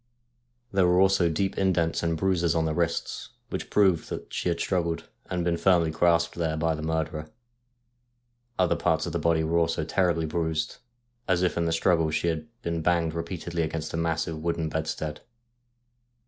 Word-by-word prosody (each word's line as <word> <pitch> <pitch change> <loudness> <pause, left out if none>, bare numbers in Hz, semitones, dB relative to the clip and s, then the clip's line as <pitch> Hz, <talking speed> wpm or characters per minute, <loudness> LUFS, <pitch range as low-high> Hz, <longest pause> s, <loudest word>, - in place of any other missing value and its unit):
There 95 -2 +4
were 90 +1 +4
also 95 -2 +4
deep 95 +4 -1
indents 90 -4 +1
and 85 -1 0
bruises 85 -3 +1
on 80 -1 +2
the 80 - 0
wrists, 85 0 -2 0.2
which - - -4
proved 95 -5 +3
that - - -6
she - - -1
had 85 - -1
struggled 85 -3 -1 0.2
and 90 -2 -1
been 85 -1 +1
firmly 85 -3 +3
grasped 85 +1 +2
there 80 -2 -1
by 80 +1 +1
the 75 - -5
murderer. 80 -1 -2 1.3
Other 90 -2 +3
parts - - +1
of - - -4
the - - 0
body 85 -1 +2
were 85 +2 +2
also 80 -2 0
terribly 85 -1 +1
bruised, 80 0 -2 0.5
as 95 -1 +2
if 90 - +1
in 85 - 0
the 80 - +1
struggle 80 -1 +2
she 80 +2 0
had 80 +5 -3 0.2
been 85 -1 -2
banged 85 -1 +1
repeatedly 85 0 -3
against 80 0 -3
the - - -3
massive 80 -1 -1
wooden 85 -1 -1
bedstead. 80 -1 -3
85 Hz, 175 wpm, -27 LUFS, 80-85 Hz, 1.3 s, There